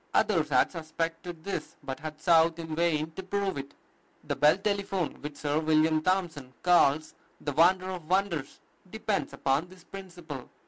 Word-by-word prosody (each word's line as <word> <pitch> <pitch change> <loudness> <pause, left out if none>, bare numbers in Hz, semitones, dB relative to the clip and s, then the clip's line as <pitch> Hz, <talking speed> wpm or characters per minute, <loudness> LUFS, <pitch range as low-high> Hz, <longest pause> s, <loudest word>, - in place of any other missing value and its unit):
Others - - +3
had - - +3
suspected 165 0 -4
this, 200 - -4
but 135 0 -5
had 155 -1 -7
sought 165 0 +4
in 160 -2 -5
vain 160 -2 +1
to 175 - -7
prove 195 +1 -1
it. 140 0 -7 0.5
The 145 -1 -2
Bell 150 +5 +5
telephone, 200 -3 -2
which 150 0 -7
Sir 145 +1 0
William 155 0 +3
Thompson 165 -7 -1
calls 155 -4 +4 0.3
"the 145 - -3
wonder 185 +5 +4
of 175 -4 -7
wonders," 185 -7 0 0.3
depends 220 0 -2
upon 140 +5 0
this 185 -1 -16
principle. 175 -9 -9
165 Hz, 155 wpm, -29 LUFS, 155-185 Hz, 0.5 s, Bell